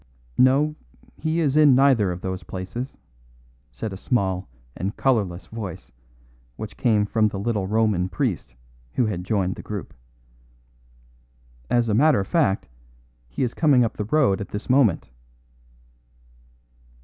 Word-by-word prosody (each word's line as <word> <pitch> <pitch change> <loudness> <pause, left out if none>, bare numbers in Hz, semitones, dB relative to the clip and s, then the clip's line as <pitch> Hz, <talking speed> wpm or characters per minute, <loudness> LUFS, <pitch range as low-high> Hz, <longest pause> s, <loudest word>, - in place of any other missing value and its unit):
"No; 140 +4 +4 0.4
he 160 +1 -1
is 145 -3 +1
in 150 -4 +6
neither 130 -8 +4
of 90 +1 -6
those 95 0 -4
places," 95 +8 -6 0.7
said 95 - -5
a - - -6
small 95 -5 -1 0.3
and 95 +3 -4
colourless 100 -9 0
voice, 105 -6 -7 0.6
which - - -7
came 105 -3 +2
from 110 +1 +2
the 100 - -4
little 100 -1 -1
Roman 105 -4 +1
priest 60 -8 -2 0.4
who 125 - +2
had 95 -5 -3
joined 95 -1 0
the - - -7
group. 100 -7 -6 1.8
"As 120 -1 +2
a 110 - +1
matter 140 +2 +4
of 95 - -2
fact, 150 - +1 0.6
he 95 - -2
is 125 - -1
coming 145 -6 +4
up 115 - -2
the 105 - -3
road 115 -5 +2
at 100 - -6
this 105 +5 -3
moment." 130 -9 +3
110 Hz, 140 wpm, -23 LUFS, 95-130 Hz, 1.8 s, in